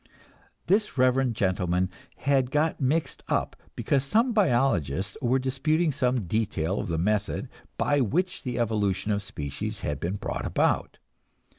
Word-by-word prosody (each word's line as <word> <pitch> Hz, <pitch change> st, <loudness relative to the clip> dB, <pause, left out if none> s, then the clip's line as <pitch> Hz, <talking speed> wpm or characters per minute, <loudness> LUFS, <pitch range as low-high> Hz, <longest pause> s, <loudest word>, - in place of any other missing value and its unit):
This 205 Hz, -3 st, +1 dB
reverend 130 Hz, -1 st, +3 dB
gentleman 90 Hz, -2 st, 0 dB, 0.2 s
had 135 Hz, -2 st, +1 dB
got 150 Hz, +2 st, 0 dB
mixed 150 Hz, +5 st, 0 dB
up -, -, 0 dB, 0.2 s
because 135 Hz, -2 st, +1 dB
some 230 Hz, -, +2 dB
biologists 110 Hz, -, +1 dB
were 125 Hz, +2 st, +2 dB
disputing 150 Hz, +5 st, +1 dB
some 125 Hz, -5 st, 0 dB
detail 95 Hz, -2 st, -1 dB
of -, -, -3 dB
the 85 Hz, -2 st, -1 dB
method 105 Hz, +4 st, 0 dB, 0.3 s
by 145 Hz, -1 st, +2 dB
which 180 Hz, -, 0 dB
the 125 Hz, -2 st, -4 dB
evolution 105 Hz, -4 st, 0 dB
of 100 Hz, 0 st, 0 dB
species 100 Hz, +2 st, -5 dB
had 75 Hz, -1 st, -2 dB
been 90 Hz, +6 st, -2 dB
brought -, -, -4 dB
about. -, -, +1 dB
120 Hz, 140 wpm, -27 LUFS, 95-140 Hz, 0.3 s, reverend